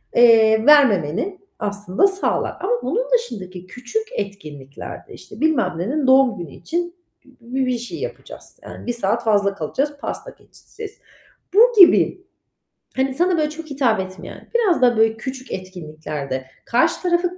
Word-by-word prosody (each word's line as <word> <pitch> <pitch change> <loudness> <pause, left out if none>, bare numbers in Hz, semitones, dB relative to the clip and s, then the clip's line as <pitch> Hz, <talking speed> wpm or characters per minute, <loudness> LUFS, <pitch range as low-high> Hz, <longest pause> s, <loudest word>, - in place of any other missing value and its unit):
eee, 225 -2 +5
vermemeni 275 - +4 0.2
aslında 205 - +1
sağlar. 385 0 -1
Ama 390 +5 -2
bunun - - -1
dışındaki 185 - -3
küçük 255 - -4
etkinlikler 150 -9 -7
de, - - -13
işte, - - -13
bilmem 265 - +1
nenin 260 - -1
doğum 260 -5 +5
günü 170 -5 -7
için 345 +1 -3 0.3
bü 250 -2 -12
bir 265 -1 +1
bir 250 -1 0
şey 245 +8 -7
yapacağız. 485 +3 -9
Yani - - -10
1 240 - 0
saat 230 0 -1
fazla 205 -3 +2
kalacağız, 270 - -2
pasta - - -6
keseceğiz. 430 -2 -12 0.6
Bu 425 - +6 0.2
gibi, 370 +1 +6 0.7
hani, 265 0 0
sana, 350 +4 +1
böyle, 305 -1 +1
çok 320 +1 -8
hitap 255 -7 +1
etmeyen, 185 0 -8
biraz 410 - +2
da, 245 -2 +4
böyle, 220 0 +3
küçük 260 +2 -7
etkinliklerde 155 -7 -6 0.2
karşı 240 +2 +1
tarafı 355 0 0
245 Hz, 150 wpm, -21 LUFS, 200-325 Hz, 0.7 s, Bu